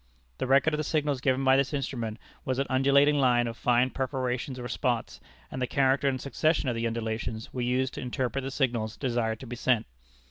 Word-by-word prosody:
The - - -1
record 140 +4 +4
of 150 - 0
the - - 0
signals 145 -4 0
given 130 0 +1
by 130 0 +5
this 140 +2 +1
instrument 120 -5 -3 0.3
was 130 -1 -1
an 135 - +1
undulating 140 +2 +4
line 120 -2 +3
of 115 -1 -4
fine 125 +2 +2
perforations 130 0 -2
or 120 -1 -5
spots, 120 -1 -2 0.3
and 130 - -5
the 125 - 0
character 135 +1 +2
and 130 -1 0
succession 155 +2 0
of - - 0
the 115 0 -1
undulations 115 -1 -4
were 125 - -3
used 125 +2 0
to - - -6
interpret 130 +1 -2
the 135 - -3
signals 120 -5 -1
desired 115 -4 -1
to - - -7
be 120 0 -6
sent. 120 -1 +1
130 Hz, 210 wpm, -28 LUFS, 120-135 Hz, 0.3 s, by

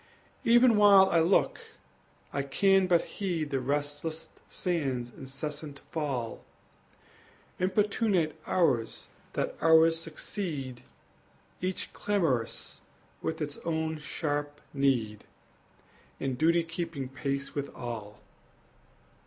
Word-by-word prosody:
Even 240 -1 +6
while 200 -2 +7
I 165 - +4
look, 170 +4 +3 0.7
I 140 - 0
can 190 +7 +3
but 175 -2 +4
heed 170 -7 -3
The 135 - +1
restless 145 +4 -2 0.2
sands' 135 -9 -2
incessant 140 +2 -6
fall, 135 -8 -3 1.2
Importunate 195 -3 +2
hours 130 -11 +1 0.2
that - - -2
hours 165 0 +6
succeed, 155 - -5 0.8
Each 185 +1 -2
clamorous 165 - -1 0.4
with 160 0 -2
its 145 -1 -6
own 160 -1 -2
sharp 145 -1 -3
need, 120 -7 +1 0.9
And 135 -2 -1
duty 165 +4 +3
keeping 165 -4 -4
pace 140 +1 -3
with 140 -1 -3
all. 110 -4 -6
155 Hz, 95 wpm, -29 LUFS, 135-175 Hz, 1.2 s, while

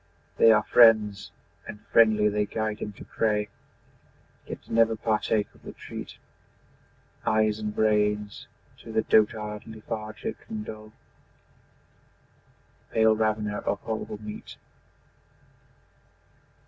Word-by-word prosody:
They 115 - +7
are 105 -1 +4
friends; 110 -4 +4 0.4
and 105 0 -10
friendly 110 -2 +5
they 105 0 0
guide 110 0 -3
him 105 - -5
to - - -12
prey, 105 -2 0 1.0
Yet - - -8
never 115 0 +3
partake 110 -1 0
of - - -22
the - - -9
treat - - -9 1.1
Eyes 110 0 +1
and 105 -1 -4
brains 105 -1 0 0.3
to 115 - -10
the 110 0 +1
dotard 105 -1 +1
lethargic 110 - -6
and 215 -1 -5
dull, 110 0 -10 2.0
Pale 110 0 +4
ravener 110 -1 -1
of 100 - -1
horrible 110 -1 -5
meat. 105 0 -9
110 Hz, 110 wpm, -26 LUFS, 105-110 Hz, 2.0 s, They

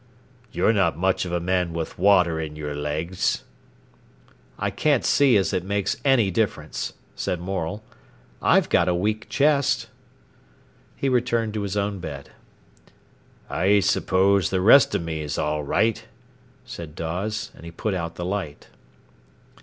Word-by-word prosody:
"You're 110 - +2
not 100 -3 +1
much 95 +2 +1
of 90 - -5
a 85 - 0
man 90 -1 0
with 80 0 -5
water 90 -4 +4
in 75 -1 -5
your 75 -1 -5
legs." 75 +5 -2 1.1
"I - - -2
can't 145 -5 +1
see 135 -6 +4
as 95 0 0
it 90 -2 0
makes 100 +1 -1
any 125 -8 +3
difference," 110 +1 -2 0.2
said 90 - -3
Morel. 95 +3 -4 0.6
"I've - - +4
got 85 - +3
a 90 - +2
weak 105 +4 -2
chest." 140 -2 +2 1.1
He 140 - -2
returned 120 -3 +1
to 105 - -2
his 100 0 -3
own 100 -1 -1
bed. 70 -5 -8 1.2
"I 100 +2 +2
suppose 95 -1 +2
the 95 - 0
rest 115 +9 +6
of - - -1
me's 75 -3 -4
all 75 0 -1
right," 110 +9 +1 0.6
said 80 -2 -9
Dawes, 95 +7 -3
and - - -15
he 85 - -8
put 100 +5 -3
out 85 -2 -4
the 85 - -5
light. 90 -6 -4
95 Hz, 145 wpm, -24 LUFS, 85-105 Hz, 1.2 s, rest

